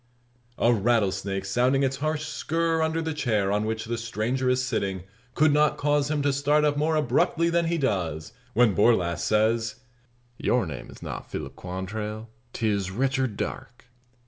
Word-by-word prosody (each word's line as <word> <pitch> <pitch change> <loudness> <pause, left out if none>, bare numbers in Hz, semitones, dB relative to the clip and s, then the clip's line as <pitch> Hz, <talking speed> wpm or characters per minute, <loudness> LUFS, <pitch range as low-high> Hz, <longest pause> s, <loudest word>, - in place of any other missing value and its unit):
A 120 - +4
rattlesnake 100 -3 0
sounding 125 +7 +2
its 135 0 0
harsh 155 +1 -2
"skirr" 165 0 -1
under 160 +1 0
the 160 0 -2
chair 110 -9 0
on 105 +1 +1
which 110 +1 -3
the 120 +1 -3
stranger 115 +3 -1
is 125 0 +1
sitting 95 -7 -2 0.3
could 155 -1 +4
not 150 0 +3
cause 145 0 +1
him 150 -2 0
to 140 -1 +2
start 145 +2 +2
up 145 -1 +2
more 155 +2 +1
abruptly 155 +4 +2
than 170 0 +2
he 170 +1 0
does, 90 - -2 0.2
when 120 -3 +5
Borlasse 90 -4 +2
says: 110 +1 +1 0.6
"Your 125 -4 +1
name 75 -6 -7
is - - -12
not - - -6
Philip 65 0 -6
Quantrell: 105 +5 -5 0.2
'tis 105 -5 -1
Richard 130 +1 -1
Darke!" 120 - -6
120 Hz, 165 wpm, -26 LUFS, 105-145 Hz, 0.6 s, when